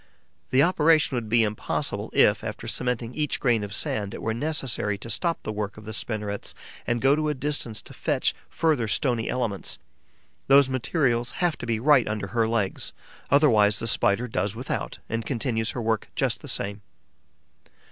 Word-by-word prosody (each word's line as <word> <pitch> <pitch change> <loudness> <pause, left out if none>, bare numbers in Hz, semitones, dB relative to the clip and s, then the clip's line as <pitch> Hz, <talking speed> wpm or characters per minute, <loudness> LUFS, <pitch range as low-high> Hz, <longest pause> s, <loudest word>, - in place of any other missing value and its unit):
The 130 +2 +4
operation 160 -4 +4
would 115 -3 -3
be 115 +1 +4
impossible 105 -1 -2
if, - - +4
after - - -5
cementing 125 -1 -2
each 150 0 -1
grain 115 -4 +2
of 100 - -6
sand, 105 0 -2
it - - -7
were 110 - 0
necessary 125 -6 -1
to 115 +4 -4
stop 170 -2 0
the - - -3
work 105 -1 -4
of 110 - -11
the 110 - -5
spinnerets 105 -2 -4 0.3
and 120 0 0
go 135 +2 +5
to 155 0 0
a 150 - -1
distance 130 -5 -2
to - - -12
fetch - - 0 0.2
further 155 -9 +1
stony 120 +1 +1
elements. 115 -6 -2 0.7
Those 140 0 +6
materials 125 -2 0
have 175 -3 +1
to 120 - -6
be 115 -2 0
right 140 -1 +5
under 105 -2 -3
her 115 +1 +1
legs; 110 -4 -1 0.4
otherwise 110 -8 +5
the 115 - -3
Spider 115 +1 +2
does 100 -1 -2
without 125 +3 -4
and 115 0 -2
continues 115 -1 -1
her - - -1
work 110 -1 0
just - - 0
the - - -9
same. 100 +1 -2
115 Hz, 175 wpm, -26 LUFS, 110-135 Hz, 0.7 s, Those